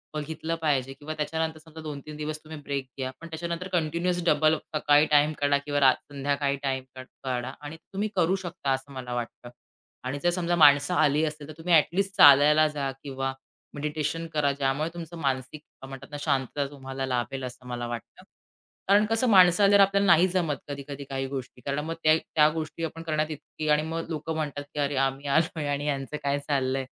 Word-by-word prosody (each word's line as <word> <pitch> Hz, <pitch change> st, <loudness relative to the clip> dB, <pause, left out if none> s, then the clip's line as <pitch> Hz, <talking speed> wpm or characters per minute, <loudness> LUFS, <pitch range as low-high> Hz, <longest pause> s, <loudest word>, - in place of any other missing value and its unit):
बघितलं 160 Hz, +2 st, -3 dB
पाहिजे 135 Hz, -4 st, 0 dB
किंवा 145 Hz, +3 st, -7 dB
त्याच्यानंतर 160 Hz, +1 st, -2 dB
समजा 160 Hz, 0 st, -12 dB
2-3 150 Hz, 0 st, -7 dB
दिवस 155 Hz, 0 st, -4 dB
तुम्ही 155 Hz, -1 st, -9 dB
ब्रेक 140 Hz, -2 st, -3 dB
घ्या 130 Hz, -1 st, -3 dB
पण 165 Hz, -, -8 dB
त्याच्यानंतर 170 Hz, +2 st, -4 dB
कंटिन्युअस 170 Hz, +2 st, 0 dB
डबल 155 Hz, -1 st, +4 dB
अप 155 Hz, -, -5 dB
सकाळी 150 Hz, 0 st, +4 dB
टाईम 150 Hz, +1 st, +5 dB
काढा 145 Hz, 0 st, +3 dB
किंवा 145 Hz, 0 st, -2 dB
रा 130 Hz, -2 st, +6 dB
संध्याकाळी 140 Hz, 0 st, -2 dB
टाईम 130 Hz, -1 st, -1 dB, 0.4 s
काढा 125 Hz, -1 st, -2 dB
आणि 150 Hz, +2 st, -8 dB, 0.2 s
तुम्ही 210 Hz, +2 st, -1 dB
करू 180 Hz, +1 st, +3 dB
शकता 140 Hz, -5 st, -3 dB
असं 135 Hz, +1 st, -2 dB
मला 125 Hz, -2 st, -6 dB
वाटतं 120 Hz, 0 st, -5 dB, 0.6 s
आणि 140 Hz, +3 st, -3 dB
जर 175 Hz, -, +4 dB
समजा 175 Hz, -1 st, 0 dB
माणसं 145 Hz, +1 st, +6 dB
आली 150 Hz, -1 st, +3 dB
असतील 150 Hz, -1 st, -5 dB
तर 155 Hz, -, -9 dB
तुम्ही 170 Hz, +1 st, -1 dB
ॲट 160 Hz, +1 st, +5 dB
लीस्ट 195 Hz, 0 st, 0 dB
चालायला 150 Hz, +2 st, +7 dB
जा 140 Hz, -3 st, -3 dB
किंवा 135 Hz, -1 st, -3 dB, 0.4 s
मेडिटेशन 150 Hz, +2 st, -2 dB
करा. 145 Hz, -2 st, +2 dB
ज्यामुळे 140 Hz, +3 st, -1 dB
तुमचं 170 Hz, 0 st, -8 dB
मानसिक 135 Hz, 0 st, -2 dB, 0.3 s
म्हणतात 135 Hz, 0 st, -9 dB
ना 145 Hz, -, -5 dB
शांतता 140 Hz, -1 st, 0 dB
तुम्हाला 135 Hz, -1 st, -5 dB
लाभेल 130 Hz, +1 st, -2 dB
असं 125 Hz, 0 st, -8 dB
मला 120 Hz, -1 st, -4 dB
वाटतं. 120 Hz, -1 st, -8 dB, 0.6 s
कारण 205 Hz, +2 st, +5 dB
कसं 225 Hz, +3 st, +2 dB
माणसं 185 Hz, -1 st, +6 dB
आल्यावर 200 Hz, 0 st, +6 dB
आपल्याला 200 Hz, +1 st, +2 dB
नाहीच 175 Hz, +1 st, +5 dB
जमत 165 Hz, -6 st, +1 dB
कधी-कधी 140 Hz, 0 st, -6 dB
काही 135 Hz, 0 st, -2 dB
गोष्टी. 130 Hz, -2 st, -7 dB
कारण 140 Hz, +1 st, -1 dB
मग 165 Hz, -, -3 dB
त्या 155 Hz, 0 st, +6 dB
त्या 150 Hz, -1 st, +3 dB
गोष्टी 160 Hz, +1 st, -5 dB
आपण 165 Hz, +1 st, -4 dB
करण्यात 155 Hz, -1 st, -1 dB
इतकी 155 Hz, +1 st, -7 dB
आणि 150 Hz, 0 st, +4 dB
मग 165 Hz, +1 st, -4 dB
लोकं 160 Hz, 0 st, -3 dB
म्हणतात 145 Hz, -2 st, -3 dB
की, 150 Hz, -, -4 dB
"अरे, 140 Hz, 0 st, 0 dB
आम्ही 135 Hz, +1 st, 0 dB
आलोय 155 Hz, +1 st, +1 dB
आणि 145 Hz, 0 st, -1 dB
ह्यांचं 140 Hz, +1 st, -2 dB
काय 140 Hz, 0 st, 0 dB
चाललंय?" 135 Hz, -2 st, 0 dB
150 Hz, 190 wpm, -27 LUFS, 135-160 Hz, 0.6 s, चालायला